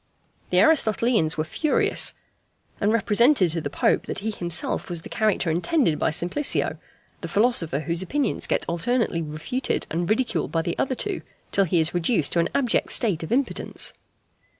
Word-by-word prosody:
The - - +1
Aristotelians 230 - +2
were 155 - 0
furious, 295 - +1 0.6
and 205 0 +1
represented 225 - +3
to 165 0 -1
the 145 - -4
Pope - - 0
that - - -4
he 220 +3 -3
himself 175 -3 -1
was 170 -2 -4
the - - -10
character 210 -6 0
intended 175 - +1
by - - +1
Simplicio, 175 - 0 0.4
the - - -5
philosopher 200 - +2
whose 165 +3 -1
opinions 280 +10 -1
get - - 0
alternately 175 +1 -1
refuted 160 - -3
and 170 +1 -2
ridiculed 235 +3 0
by 165 -1 0
the 170 0 -3
other 260 -1 0
two, 405 +8 -2 0.3
till 195 - +3
he 175 0 +1
is 160 +1 +1
reduced 175 - +1
to 170 - +1
an 170 - +1
abject 255 -4 +1
state 200 -9 +2
of 160 - -7
impotence. 265 +3 0
190 Hz, 170 wpm, -24 LUFS, 165-245 Hz, 0.6 s, represented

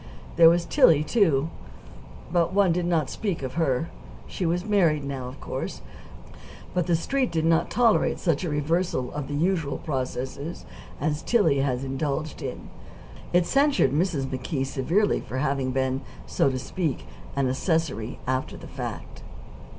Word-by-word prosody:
There 165 -1 +8
was 170 0 +2
Tillie, 155 -3 +5
too. 160 - +2 0.8
But 170 0 +2
one 195 -2 +4
did 175 +1 0
not 160 -6 +1
speak 195 -9 -3
of 130 -1 -4
her. 160 -1 0 0.3
She 180 - -3
was 175 +3 0
married 170 -9 +3
now, 135 -2 -4
of 130 +2 -9
course; - - -5 0.9
but 180 -1 0
the 175 - +3
Street 260 +10 0
did 160 -1 0
not 165 0 +3
tolerate 230 -2 +3
such 165 -2 0
a 175 - -1
reversal 150 -2 0
of 145 -2 -4
the 145 - -4
usual 165 -2 0
processes 135 +2 -4 0.3
as 150 +1 -1
Tillie 165 - +3
had 135 -2 0
indulged 140 +3 -3
in. 130 -3 -6 0.6
It 175 0 +4
censured 280 - +3
Mrs. 155 -2 0
McKee 135 +1 -2
severely 165 +10 +1
for 130 - -6
having 135 -1 0
been, 130 0 0 0.2
so - - +2
to 130 - -2
speak, 155 +2 -3 0.3
and 140 -1 +1
accessory 130 - -1
after 130 +1 -2
the - - -11
fact. - - -7
155 Hz, 155 wpm, -26 LUFS, 135-175 Hz, 0.9 s, There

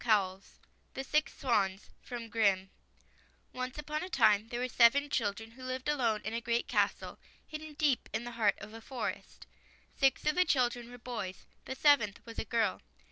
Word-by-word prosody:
47 195 -4 +2 0.3
] - - -39
THE 265 - -3
SIX 300 +3 +1
SWANS 200 -6 0 0.2
O 245 - -4
NCE 225 +3 -3
upon 300 +1 -3
a 365 - -6
time 215 - +4
there 240 +1 -4
were 250 - 0
seven 265 +4 +4
children 225 0 -1
who 255 +2 -13
lived 255 +1 -4
alone 235 -8 +1
in - - -4
a 230 - -2
great 235 0 0
castle, - - 0 0.3
hidden 310 -1 -8
deep 290 -4 +1
in - - -2
the 240 - -6
heart 220 -4 +2
of 215 - -10
a 225 - -9
forest. 255 +2 -5 0.5
Six 270 -1 +2
of 300 - +3
the 365 - +4
children 245 -6 +1
were 245 - -10
boys; 235 -7 -6 0.2
the 265 - -4
seventh 260 -9 +4
was 230 -1 -8
a - - -2
girl. 225 -3 0
240 Hz, 185 wpm, -32 LUFS, 220-265 Hz, 0.5 s, time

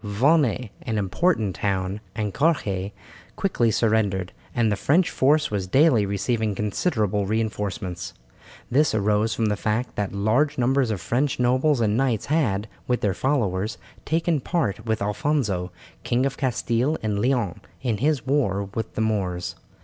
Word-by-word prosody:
Vannes, 125 +2 +2
an 110 -3 -2
important 105 - +1
town, 95 0 -1
and 105 -3 -2
Carhaix 105 - 0 0.4
quickly 125 - +1
surrendered, 105 -4 +1 0.2
and 115 -3 +2
the - - +2
French 160 - +2
force 150 +2 +2
was 100 -3 -2
daily 125 - +4
receiving 105 +2 -1
considerable 105 - 0
reinforcements. 105 -4 -3 0.6
This 140 -1 +3
arose 105 +1 +1
from 115 - 0
the 105 -1 +1
fact 110 +4 -2
that 100 -2 -1
large 120 +9 +1
numbers 130 0 +2
of 105 -4 -2
French 125 - 0
nobles 130 +2 +2
and 105 -2 +2
knights 125 -5 +1
had, 110 -10 +1 0.2
with 125 -1 0
their 100 -2 +1
followers, 110 -5 0 0.3
taken 165 0 +1
part 120 - -2
with 110 -2 0
Alfonso, 105 - -1 0.3
King 125 +2 +1
of 135 0 -1
Castile 130 +2 0
and 105 -2 0
Leon, 120 -6 0 0.2
in 120 -5 0
his 140 +1 0
war 100 -8 0
with 110 0 -4
the - - -1
Moors. 95 -5 -1
110 Hz, 150 wpm, -24 LUFS, 100-135 Hz, 0.6 s, daily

